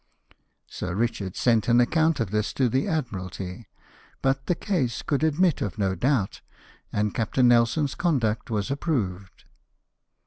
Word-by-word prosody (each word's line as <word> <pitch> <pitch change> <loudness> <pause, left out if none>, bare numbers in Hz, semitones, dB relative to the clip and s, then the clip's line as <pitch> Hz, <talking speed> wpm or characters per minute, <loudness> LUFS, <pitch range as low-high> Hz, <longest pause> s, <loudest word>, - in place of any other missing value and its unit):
Sir 90 -1 -5
Ricliard 105 -4 -2
sent 115 -3 +2
an 120 0 +5
ac 120 - +3
count 160 -2 +2
of 110 -5 -1
this 105 0 -1
to 130 - +2
the 130 - 0
Admiralty; 95 - -4 0.6
but 135 0 0
the 180 - +2
case 160 - -1
could 145 0 0
admit 160 +1 +2
of 100 -2 -3
no 95 -2 +1
doubt, 110 +1 0 0.5
and 105 0 0
Captain 125 +2 +2
Nelson's 120 +5 +3
conduct 125 -12 0
was 105 0 -1
approved. 100 - -3
120 Hz, 145 wpm, -25 LUFS, 105-140 Hz, 0.6 s, an